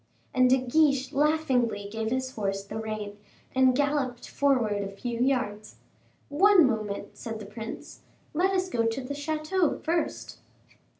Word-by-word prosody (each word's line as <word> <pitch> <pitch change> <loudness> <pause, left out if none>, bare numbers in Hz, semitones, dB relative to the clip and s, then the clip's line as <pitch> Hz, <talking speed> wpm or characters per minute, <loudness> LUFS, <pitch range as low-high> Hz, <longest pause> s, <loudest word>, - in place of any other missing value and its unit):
And 255 0 +4
De 260 - +6
Guiche, 270 +1 +2
laughingly, 265 -8 +1
gave 220 +1 -3
his 260 +1 -2
horse 195 -2 -2
the 200 +2 -6
rein, 215 -2 -5 0.3
and 260 -1 +4
galloped 280 -3 -1
forward 245 -8 +1
a 200 - -3
few 235 +4 -5
yards. 245 -5 -1 0.5
"One 365 +3 +6
moment," 215 -5 -2
said 225 -1 -6
the 210 - -8
prince. 220 +2 -8 0.3
"Let 355 +5 +2
us 375 -1 0
go 230 -10 0
to 225 +4 -2
the 260 +2 -5
chateau 310 +4 0
first." 335 +1 -2
255 Hz, 145 wpm, -27 LUFS, 220-290 Hz, 0.5 s, De